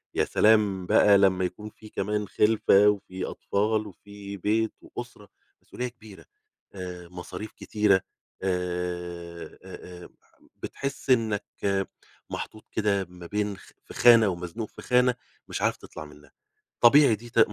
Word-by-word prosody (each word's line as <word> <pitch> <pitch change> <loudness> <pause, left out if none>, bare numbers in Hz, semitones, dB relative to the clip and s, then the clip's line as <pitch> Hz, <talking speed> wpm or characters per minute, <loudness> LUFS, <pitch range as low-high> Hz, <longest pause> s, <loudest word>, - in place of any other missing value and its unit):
يا - - +2
سلام 105 -4 +3
لمّا 95 -2 +5
يكون 105 +4 -6
في 110 0 -15
كمان 105 +1 -2
خِلفة 105 -1 +4
وفي 95 -2 -3
أطفال، 105 +1 -1
وفي 100 0 -10
بيت 110 +4 0
وأسرة، - - -9 0.3
مسؤولية 125 0 -5
كبيرة، 110 -4 -14 0.5
آآ 90 -2 -7
مصاريف 90 +4 -8
كتيرة، 105 -3 +2 0.4
آآ 90 -2 -4
آآ 90 -1 -10
آآ - - -12 0.5
بتحس 140 0 -6
إنّك 110 -5 +2 0.8
محطوط 110 - -7
كده 100 -3 +1
ما 90 -1 -12
بين 105 +1 -2
خ - - -17
في - - -11
خانة، 115 -4 +7
ومزنوق 90 +5 -5
في - - -12
خانة 125 0 +3 0.3
مش - - -4
عارف - - +1
تطلع 75 - -10
منها. 75 0 -16 0.5
طبيعي 130 0 +7
دي 120 +3 -12
ت 115 - 0
100 Hz, 135 wpm, -26 LUFS, 90-110 Hz, 0.8 s, خانة